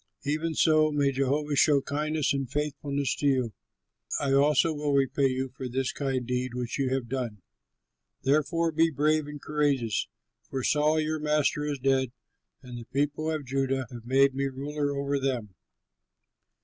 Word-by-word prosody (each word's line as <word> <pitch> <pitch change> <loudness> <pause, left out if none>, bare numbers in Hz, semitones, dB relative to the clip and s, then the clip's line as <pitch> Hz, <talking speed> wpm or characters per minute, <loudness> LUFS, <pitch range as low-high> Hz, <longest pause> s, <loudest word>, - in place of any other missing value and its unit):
Even 155 +3 -1
so 155 -1 +4
may 145 -2 +2
Jehovah 140 +2 0
show 140 +1 +5
kindness 150 +1 -1
and 135 -3 -2
faithfulness 145 -1 -1
to 145 - 0
you. 130 -5 +1 0.7
I 140 -2 0
also 150 +3 +4
will 145 -1 -1
repay 135 0 +2
you 130 0 -2
for 130 0 -7
this 130 +1 -1
kind 135 -3 -2
deed 125 0 -2
which 125 +2 -3
you 135 -2 +1
have 130 -2 -1
done. 115 -6 -4 0.8
Therefore 155 +4 +2
be 165 +1 +3
brave 155 +1 +1
and 150 0 -7
courageous; 140 -7 0 0.4
for 130 -2 -3
Saul 150 +3 +3
your 155 0 -1
master 150 0 +1
is 145 -1 -2
dead, 130 -1 +1 0.5
and 125 -2 -8
the 115 - -9
people 145 +4 -1
of 155 -3 -2
Judah 135 0 -1
have 120 -2 -9
made 135 +1 +4
me 135 +1 -1
ruler 140 +1 -2
over 140 0 0
them." 125 -7 -2
140 Hz, 160 wpm, -28 LUFS, 130-150 Hz, 0.8 s, show